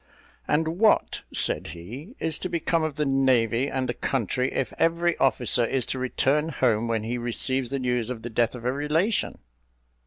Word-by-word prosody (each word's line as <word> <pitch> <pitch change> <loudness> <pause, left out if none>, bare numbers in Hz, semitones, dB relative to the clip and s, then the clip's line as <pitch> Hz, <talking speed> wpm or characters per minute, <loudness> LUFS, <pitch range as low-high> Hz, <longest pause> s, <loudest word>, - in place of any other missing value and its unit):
"And 160 +3 0
what," 220 -1 +3
said - - +2
he, 130 - -9
"is 160 -1 -1
to 185 - -4
become 170 0 0
of 155 -2 -2
the 150 - 0
navy 130 -3 +2
and 130 -1 -2
the 120 - -1
country, 130 +1 -1
if 135 - -2
every 170 +1 +2
officer 125 -2 +3
is 125 +1 0
to 130 - -3
return 140 +4 +1
home 120 -6 +1
when 115 -2 -1
he 120 +2 -3
receives 120 +2 0
the 140 - -2
news 125 -3 0
of 115 -3 -5
the 120 - -6
death 115 +1 +1
of 120 -1 -9
a 125 - +1
relation?" 155 +9 0
130 Hz, 185 wpm, -25 LUFS, 120-155 Hz, -, what